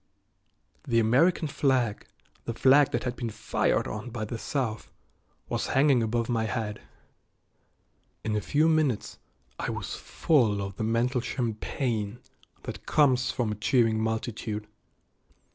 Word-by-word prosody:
The 115 -3 +3
American 140 +10 +3
flag, 130 -6 0 0.4
the 115 - -3
flag 135 +3 +5
that 120 - -2
had 125 -1 -2
been 120 -2 -3
fired 110 +1 0
on 110 +3 -5
by 110 -2 -4
the 115 +2 -5
South, 115 -6 -3 0.6
was - - -2
hanging 135 -2 +4
above 115 +1 0
my 115 -2 0
head. 110 -2 -3 1.4
In 110 -1 -1
a 105 - 0
few 150 +7 +2
minutes 155 -8 +1 0.4
I - - -2
was - - -4
full 115 -10 +1
of 100 -1 -5
the - - -2
mental 120 +3 +1
champagne 115 -2 -2 0.5
that - - -8
comes 130 -4 +3
from 120 -4 -1
a - - -2
cheering 115 -2 +3
multitude. 110 -1 -3
115 Hz, 135 wpm, -28 LUFS, 110-130 Hz, 1.4 s, flag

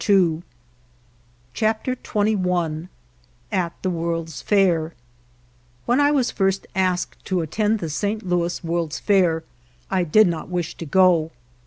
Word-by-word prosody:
196 175 -5 +3 1.1
CHAPTER 220 - 0
XXI 180 -8 -1 0.6
AT 175 -3 0
THE 185 - 0
WORLD'S 165 -2 -3
FAIR 175 -6 +2 0.9
WHEN 245 +3 +2
I 290 0 +5
was 275 -4 +1
at - - -23
first 195 -1 +1
asked 185 -2 -1
to 185 -2 0
attend 210 +7 0
the 165 -6 -4
St. 205 +6 -2
Louis 175 -1 -1
World's 165 -4 -2
Fair 175 -2 +2 0.5
I 185 -2 +2
did 215 +7 +5
not 170 -2 -2
wish 175 -3 -2
to 165 - -7
go. 175 -2 +4
180 Hz, 135 wpm, -22 LUFS, 165-205 Hz, 1.1 s, I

